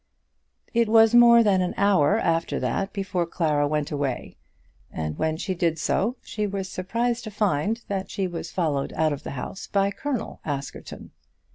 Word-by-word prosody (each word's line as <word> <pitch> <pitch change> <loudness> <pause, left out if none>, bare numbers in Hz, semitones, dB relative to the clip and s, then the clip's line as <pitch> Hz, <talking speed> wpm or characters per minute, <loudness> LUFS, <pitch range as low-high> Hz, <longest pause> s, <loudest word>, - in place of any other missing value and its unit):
It 230 -2 +2
was 225 0 +6
more 235 -1 +8
than 195 -3 +3
an 180 - -2
hour 200 -2 +4
after 165 -7 0
that 130 +10 -1
before 190 -4 -2
Clara 150 -4 +1
went 150 0 -1
away, 140 -4 -3 0.6
and 75 -1 -4
when 160 0 0
she 190 +2 -2
did 170 -2 0
so 210 +9 0
she 210 -1 -3
was 195 -1 -3
surprised 230 +6 -2
to - - -4
find 210 +2 0
that 195 -1 -3
she 195 - -2
was 175 -2 -5
followed 150 -6 -1
out 155 -1 +1
of 145 - -6
the - - -7
house 155 - -6
by 200 0 +1
Colonel 260 -1 -4
Askerton. 140 -2 -6
185 Hz, 170 wpm, -25 LUFS, 155-210 Hz, 0.6 s, more